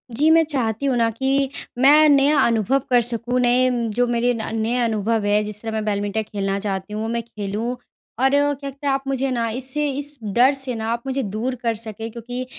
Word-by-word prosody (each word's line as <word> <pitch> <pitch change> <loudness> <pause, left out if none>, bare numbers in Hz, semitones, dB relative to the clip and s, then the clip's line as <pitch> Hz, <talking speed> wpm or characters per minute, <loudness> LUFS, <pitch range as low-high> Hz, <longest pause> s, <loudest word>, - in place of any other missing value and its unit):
जी, 300 +6 +3
मैं 325 0 +6
चाहती 260 -5 -2
हूँ 270 -2 +1
ना 230 -1 +3
कि, 270 +3 0 0.3
मैं 295 +4 +6
नया 285 +1 +4
अनुभव 230 +3 +2
कर 245 -1 +4
सकूँ, 240 +1 -1
नए 250 +1 +3 0.2
जो 245 +2 +2
मेरे 240 +1 +1
न 225 -1 -4
नए 230 +3 0
अनुभव 220 -1 0
हैं 210 +1 +2
जिस 210 0 -6
तरह 225 - -4
मैं 220 0 -2
बैडमिंटन 205 +1 -1
खेलना 195 -2 -3
चाहती 195 0 -4
हूँ, 215 +1 -3
मैं 235 0 -1
खेलूँ। 220 +2 -4 0.4
और 265 +1 +4
क्या 285 +1 +2 0.2
कहते 280 +1 -7
आप 270 0 0
मुझे 270 0 0
ना 235 -2 0
इससे 265 +5 -1
इस 285 +1 -3
डर 235 +6 +4
से 265 -2 -3
ना 220 0 -4
आप 235 0 -3
मुझे 270 +1 -1
दूर 220 +5 -3
कर 230 -1 +1
सकें 225 0 -6
क्योंकि 245 +2 -6
240 Hz, 210 wpm, -21 LUFS, 220-270 Hz, 0.4 s, मैं